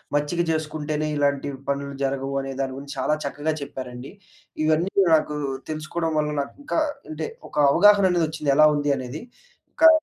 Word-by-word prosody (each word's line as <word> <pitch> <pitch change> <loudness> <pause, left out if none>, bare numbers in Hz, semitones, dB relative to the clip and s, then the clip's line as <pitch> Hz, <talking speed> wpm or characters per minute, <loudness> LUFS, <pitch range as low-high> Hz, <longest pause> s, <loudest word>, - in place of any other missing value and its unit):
మచ్చిక 145 +4 0
చేస్కుంటేనే, 155 -1 -2
ఇలాంటి 140 0 +1 0.2
పనులు 140 0 -2
జరగవు 135 0 -2
అనే 135 0 -5
దాని 135 -1 -3
గురించి, 140 +1 -8
చాలా 150 +3 +1
చక్కగా 145 +2 -2
చెప్పారండి. 130 -2 -7 0.5
ఇవన్నీ 160 +4 +2
కూడా 190 -3 +5
నాకు, 150 -1 -3 0.3
తెలుసుకోడం 155 +2 -2
వల్ల 150 0 0
నాకింకా 285 - -3 0.3
అంటే, 315 - -4 0.2
ఒక - - -15 0.2
అవగాహన 200 +5 +6
అనేదొచ్చింది, 160 -4 0
ఎలా 155 0 +8
ఉంది 145 0 +1
అనేది. 130 +3 -6 0.5
ఇంకా 325 - +7
150 Hz, 150 wpm, -24 LUFS, 140-160 Hz, 0.5 s, ఎలా